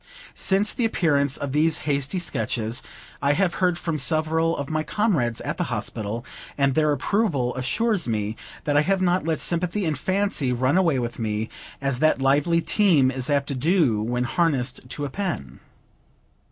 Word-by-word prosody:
Since 195 +2 +1
the 245 - -2
appearance 145 - +1
of 140 -1 -4
these 155 +2 +3
hasty 140 +4 -1
Sketches, 115 -7 -1 0.4
I 140 +1 +3
have 180 +2 +1
heard 180 -2 +2
from 165 -3 -3
several 160 +3 +1
of 140 - -4
my 155 +1 -1
comrades 155 - 0
at - - -4
the - - -1
Hospital; 110 +3 -4 0.3
and 140 -1 +2
their 155 +1 +2
approval 145 - 0
assures 195 - 0
me 110 -1 -1 0.3
that 145 -2 0
I 145 - +6
have 190 +4 +1
not 180 -1 +1
let 160 -1 0
sympathy 180 +3 0
and 155 -2 0
fancy 185 -4 0
run 130 +5 +1
away 170 -7 +3
with 120 -1 -3
me, 110 0 -2 0.3
as 135 -2 -1
that 155 -1 +3
lively 145 +5 +2
team 165 -11 +3
is 130 +1 -2
apt 140 -1 +2
to - - -1
do 140 - +2
when 125 +3 -1
harnessed 130 -3 -1
to 145 +2 -4
a - - -4
pen. 170 - -4
145 Hz, 175 wpm, -24 LUFS, 130-175 Hz, 0.4 s, I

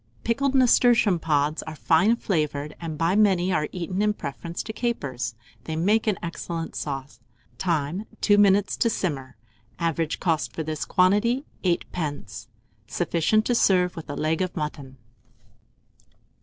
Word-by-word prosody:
Pickled 275 +4 0
nasturtium 240 -7 +4
pods 150 -1 +1
are 155 - -8
fine 175 +9 +3
flavoured, 150 -8 -2
and 160 -2 -5
by 165 +4 +1
many 190 -3 +3
are 150 -2 +1
eaten 180 +2 -3
in 210 0 +2
preference 165 0 -6
to 220 - -6
capers. 140 - -3 0.3
They 160 - -3
make 210 +8 +2
an 210 -4 +2
excellent 170 -1 -5
sauce. 135 -4 -5 0.4
Time. 170 +2 -1
2 205 -1 +4
minutes 200 0 +4
to 230 - +2
simmer. 140 - -3 0.4
Average 165 -2 -1
cost 165 -4 0
for 160 - -3
this 155 -1 -3
quantity, 210 +9 +2 0.2
8d. 155 - -3 0.4
Sufficient 215 +6 +1
to 245 - +1
serve 185 -5 +3
with 165 -2 -8
a 145 - -4
leg 155 +3 0
of 185 -1 -2
mutton. 145 -4 -5
170 Hz, 140 wpm, -25 LUFS, 150-205 Hz, 0.4 s, nasturtium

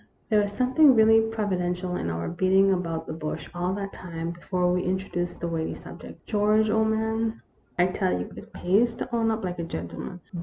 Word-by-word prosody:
" - - -40
There 215 -2 +4
was 205 0 -1
something 260 +5 +5
really 225 0 +6
providential 185 -5 -1
in 85 - -2
our 85 0 -3
beating 190 +2 +3
about 165 -3 -2
the - - -5
bush 155 -1 -5
all 175 +1 -1
that 200 -1 -5
time 170 -2 -5
before 180 +1 0
we 180 0 0
in 185 +1 +1
troduced 175 -2 -4
the 170 - -2
weighty 165 -1 -2
subject. - - -11
George, 215 0 +2
old 220 0 +3
man, 220 +1 -1 0.3
I 175 - +5
tell 185 - 0
you 90 - -5
it - - -11
pays 225 +6 +2
to 240 - -4
own 225 -1 +2
up 220 -1 -1
like 180 -1 -3
a - - -1
gentleman. 165 - -6
185 Hz, 205 wpm, -26 LUFS, 175-220 Hz, 0.3 s, really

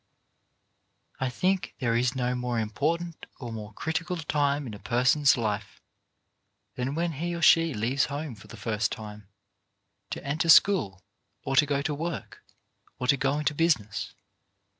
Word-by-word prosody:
I 130 - 0
think 185 +9 -1
there 115 -2 0
is 125 +2 +1
no 125 -1 0
more 125 -1 -2
important 160 +10 -2
or 120 -4 -6
more 105 -1 -7
critical 165 - -3
time 145 -2 0
in 115 - -6
a 105 - -8
person's 130 +5 +3
life 105 -3 -3 0.9
than 130 +3 -3
when 170 +1 0
he 170 +4 -3
or 170 - -5
she 165 -3 +5
leaves 120 +6 +1
home 145 -1 -5
for 105 - -14
the - - -11
first 110 -2 -1
time, 105 -2 -8 0.8
to - - -6
enter 155 +4 -1
school, 135 - +5 0.4
or 135 - -2
to 145 +1 +5
go 140 -1 0
to 150 - -1
work, 165 +1 -5 0.5
or 125 - -3
to 135 - +4
go 140 +1 0
into 150 0 0
business. 145 -11 0
135 Hz, 160 wpm, -27 LUFS, 115-160 Hz, 0.9 s, she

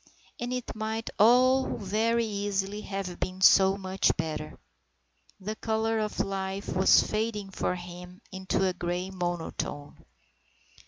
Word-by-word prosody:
And 240 +1 -3
it 250 -1 -4
might 220 +1 -3
all 255 +4 +5
very 225 +4 +1
easily 205 -1 -2
have 195 -4 -5
been 185 0 -3
so 190 0 +6
much 190 0 0
better. 155 -1 -4 0.8
The 210 +3 -4
colour 220 0 0
of 215 -1 -3
life 195 0 -3
was 190 +1 +6
fading 215 -2 -2
for 180 - -1
him 180 +1 -10
into 190 0 -1
a 185 - +1
grey 180 +1 -3
monotone. 175 -5 -4
195 Hz, 125 wpm, -28 LUFS, 185-220 Hz, 0.8 s, so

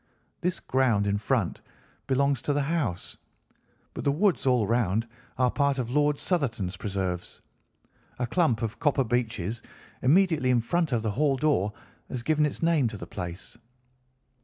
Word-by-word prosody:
This 180 +1 -1
ground 125 -6 +2
in 100 0 0
front 110 -5 -1 0.5
belongs 140 -1 +2
to 145 - 0
the 145 0 +1
house, 140 - -2 0.8
but - - -5
the 140 - +3
woods 170 -1 +1
all 125 -4 +3
round 115 -1 +1 0.3
are 125 -1 +3
part 140 -1 +1
of 120 -2 -2
Lord 150 +1 +3
Southerton's 115 - -1
preserves. 95 -3 -4 0.8
A 125 - -1
clump 125 -4 +1
of 115 0 -3
copper 145 -3 +2
beeches 115 -3 -2 0.4
immediately 160 -1 +3
in 125 -1 +4
front 160 +7 0
of 115 -3 0
the 110 - 0
hall 140 +4 +2
door 130 -8 +1 0.4
has 125 -2 -4
given 150 +2 +2
its 150 - -6
name 165 -6 +3
to 110 -2 -5
the - - -7
place. 90 +4 -7
125 Hz, 160 wpm, -27 LUFS, 110-145 Hz, 0.8 s, in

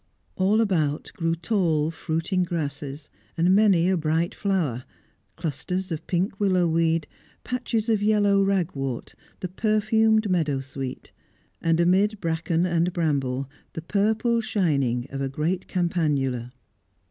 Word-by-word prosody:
All 200 +4 +3
about 155 -9 0
grew 165 -1 0
tall, 165 -4 +1
fruiting 165 +4 -1
grasses, 145 -4 -4 0.3
and 175 +3 +4
many 195 -4 +4
a 190 - +3
bright 165 +1 0
flower; 165 - -1 0.5
clusters 180 +5 -3
of 160 - -5
pink 190 +2 -1
willow 185 -4 +3
weed, 165 -1 +1 0.4
patches 245 -3 -2
of 220 -3 +2
yellow 205 -1 +3
ragwort, 165 -10 -1 0.3
the 185 - -2
perfumed 215 +2 +2
meadowsweet, 135 -7 -2 0.5
and, 165 0 +2
amid 195 +5 +3
bracken 165 0 0
and 170 0 +1
bramble, 140 -6 0 0.3
the 160 - -6
purple 220 +5 +1
shining 140 - 0
of 135 0 -4
a 135 - -1
great 165 +7 -2
campanula. 145 -9 0
170 Hz, 125 wpm, -25 LUFS, 150-195 Hz, 0.5 s, and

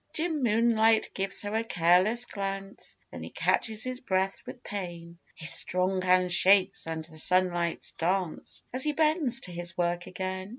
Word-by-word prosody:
Jim 320 -2 -1
Moonlight 225 -1 +3
gives 195 +1 -2
her 205 +1 -4
a 225 +1 +1
careless 185 +4 +3
glance 195 -2 -5
Then - - -8
he - - -7
catches 220 -1 -1
his 255 0 -4
breath 190 -4 -1
with 245 - -9
pain 170 -4 -7 0.2
His 155 - -2
strong 185 +1 +1
hand 185 -1 +3
shakes 190 -2 +4
and 160 -1 -4
the 160 -1 -9
sunlights 175 -1 +1
dance 180 0 -3
As 260 +1 +1
he 300 - +1
bends 305 -5 +1
to 180 - -9
his 175 0 -5
work 175 0 -1
again. 185 +1 -5
190 Hz, 165 wpm, -28 LUFS, 175-225 Hz, 0.2 s, shakes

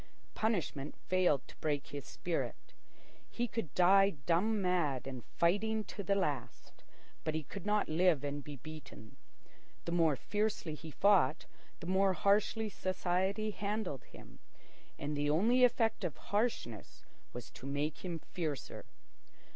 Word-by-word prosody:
Punishment 175 -10 -1
failed 180 -7 +1
to - - -14
break 145 -2 -1
his 140 -3 -6
spirit. 175 -2 -3 0.6
He 240 0 -1
could 225 - -3
die 195 +2 +6
dumb 205 +7 +2
mad 175 -8 +1
and 130 -3 -6
fighting 210 - +1
to 205 - -7
the 200 +1 +1
last, 145 - -3 0.4
but 155 -1 -1
he 160 - -1
could 200 +6 -8
not 210 0 +2
live 160 -2 +3
and 145 0 -3
be 145 0 -7
beaten. 140 -5 -11 0.7
The 170 - -2
more 165 -4 +4
fiercely 205 - -1
he 160 +1 -8
fought, 180 -4 +3 0.4
the - - -6
more 190 +1 +3
harshly 210 +3 +2
society 190 +2 0
handled 205 - -3
him, - - -14 0.6
and 150 +1 -3
the 145 0 +1
only 225 +12 +4
effect 225 -3 +3
of 165 -7 -2
harshness 205 - -2 0.3
was 120 -1 -8
to 130 - -9
make 145 +2 -2
him 175 -3 -3
fiercer. 155 -6 -4
175 Hz, 140 wpm, -34 LUFS, 145-205 Hz, 0.7 s, die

